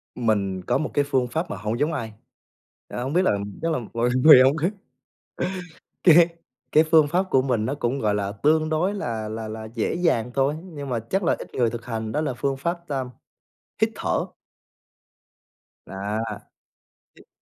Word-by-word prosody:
Mình 100 Hz, -5 st, 0 dB
có -, -, +2 dB
một 155 Hz, -, -3 dB
cái 145 Hz, -, +3 dB
phương 130 Hz, -3 st, +1 dB
pháp 160 Hz, +6 st, -3 dB
mà -, -, -4 dB
hông 110 Hz, +3 st, -3 dB
giống 155 Hz, +2 st, +1 dB
ai, 115 Hz, -7 st, -4 dB, 0.7 s
à, -, -, -5 dB
hông 135 Hz, +4 st, -3 dB
biết 180 Hz, -, +4 dB
là -, -, +4 dB, 0.3 s
chắc 165 Hz, 0 st, 0 dB
là 155 Hz, -, 0 dB
mọi 120 Hz, +1 st, +1 dB
người 150 Hz, -5 st, +10 dB
không 135 Hz, +4 st, +3 dB
á 170 Hz, +5 st, +1 dB, 1.3 s
Cái 170 Hz, -1 st, +6 dB, 0.4 s
cái 155 Hz, -, +6 dB
phương 155 Hz, -2 st, +5 dB
pháp 180 Hz, +5 st, +1 dB
của 130 Hz, -, +4 dB
mình 120 Hz, -5 st, 0 dB
nó 135 Hz, -, -1 dB
cũng, 135 Hz, 0 st, -1 dB
gọi 105 Hz, -1 st, +1 dB
là, 100 Hz, -1 st, -2 dB
tương 155 Hz, +8 st, +2 dB
đối 175 Hz, +6 st, +1 dB
là 110 Hz, -, -3 dB
là 110 Hz, 0 st, -5 dB
là 110 Hz, 0 st, -6 dB
dễ 115 Hz, -, -1 dB
dàng 155 Hz, -9 st, +1 dB
thôi, 135 Hz, +2 st, +2 dB
nhưng 145 Hz, -7 st, -8 dB
mà 120 Hz, -2 st, 0 dB
chắc 180 Hz, -, -2 dB
là 170 Hz, -, +2 dB
ít -, -, -10 dB
người 120 Hz, -2 st, +2 dB
thực 120 Hz, 0 st, -7 dB
hành 110 Hz, -2 st, -4 dB
đó 150 Hz, -, 0 dB
là 140 Hz, -5 st, -1 dB
phương 135 Hz, +2 st, -2 dB
pháp 170 Hz, +3 st, -3 dB
tam 135 Hz, -3 st, -3 dB, 0.7 s
hít -, -, +4 dB
thở. -, -, -1 dB, 1.6 s
Đó. 100 Hz, +3 st, -4 dB, 1.0 s
Hít -, -, -19 dB
135 Hz, 190 wpm, -24 LUFS, 115-155 Hz, 1.6 s, người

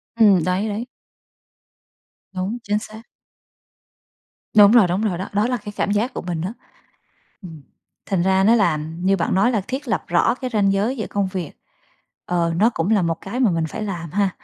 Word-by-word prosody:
Ừm, 205 Hz, -7 st, +5 dB
đấy, 185 Hz, +4 st, 0 dB
đấy. 215 Hz, +3 st, -4 dB, 1.5 s
Đúng, 190 Hz, +5 st, -3 dB
chính 210 Hz, -1 st, 0 dB
xác. 215 Hz, +1 st, -10 dB, 1.5 s
Đúng 205 Hz, 0 st, +8 dB
rồi, 235 Hz, -5 st, +6 dB
đúng 180 Hz, +3 st, -1 dB
rồi 195 Hz, -6 st, -1 dB
đó, 190 Hz, -, -5 dB
đó 205 Hz, +2 st, +1 dB
là 250 Hz, 0 st, 0 dB
cái 210 Hz, -2 st, -8 dB
cảm -, -, -1 dB
giác 210 Hz, +5 st, 0 dB
của -, -, -4 dB
mình 175 Hz, -2 st, -4 dB
á. 185 Hz, +5 st, -3 dB, 0.9 s
Ừm, 160 Hz, -5 st, -11 dB, 0.4 s
thành 190 Hz, -4 st, 0 dB
ra 190 Hz, +1 st, +2 dB
nó 225 Hz, +3 st, +5 dB
là 200 Hz, -9 st, +3 dB
như 165 Hz, +6 st, -1 dB
bạn 170 Hz, -, -1 dB
nói 195 Hz, +6 st, +3 dB
là 220 Hz, -4 st, 0 dB
thiết 265 Hz, +3 st, -4 dB
lập -, -, -1 dB
rõ -, -, +2 dB
cái 255 Hz, -1 st, -5 dB
ranh 200 Hz, -3 st, +2 dB
giới 210 Hz, +7 st, 0 dB
giữa 220 Hz, -, -4 dB
công 200 Hz, -1 st, -1 dB
việc, 180 Hz, -6 st, -4 dB, 0.7 s
ờ, 170 Hz, -1 st, 0 dB
nó 215 Hz, +6 st, +4 dB
cũng 165 Hz, +5 st, -1 dB
là 210 Hz, -4 st, +3 dB
một 165 Hz, -1 st, 0 dB
cái 235 Hz, +6 st, -5 dB
mà 240 Hz, -6 st, +4 dB
mình 165 Hz, -2 st, 0 dB
phải 215 Hz, -, -6 dB
làm 175 Hz, -6 st, -5 dB
ha? 200 Hz, +2 st, +1 dB
200 Hz, 200 wpm, -21 LUFS, 180-215 Hz, 1.5 s, Đúng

